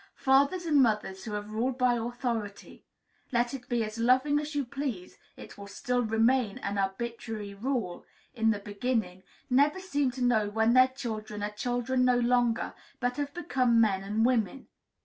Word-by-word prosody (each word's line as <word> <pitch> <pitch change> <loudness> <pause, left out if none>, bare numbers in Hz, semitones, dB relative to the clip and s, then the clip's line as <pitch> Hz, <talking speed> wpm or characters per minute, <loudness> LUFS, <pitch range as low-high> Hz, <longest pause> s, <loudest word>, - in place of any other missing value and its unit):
Fathers 280 +7 +2
and 300 -4 +4
mothers 210 -5 0
who 215 - -5
have 210 0 -5
ruled 245 +4 -1
by 250 -1 +3
authority 235 -3 -4 0.5
(let 240 0 +1
it 255 -3 -8
be 240 -2 +1
as 215 +1 -6
loving 260 +5 +3
as 300 0 -5
you 285 -2 0
please, 245 -8 -5 0.2
it - - -12
will 200 - -8
still 245 +5 -1
remain 225 0 +2
an 200 0 -3
arbitrary 210 +1 -4
rule) 225 -4 -3 0.3
in 225 -3 +1
the 215 - +2
beginning, 205 -2 -2 0.3
never 285 +6 +3
seem 290 -8 0
to 250 0 -4
know 220 -4 +2
when 220 +2 +2
their 255 0 +7
children 220 -5 -6
are 210 - -2
children 245 +3 -1
no 250 -1 +4
longer, 240 -1 +1 0.3
but 245 +1 -1
have 285 -1 -2
become 255 -9 +2
men 200 -4 +3
and 210 +3 0
women. 245 0 0
240 Hz, 170 wpm, -29 LUFS, 215-260 Hz, 0.5 s, their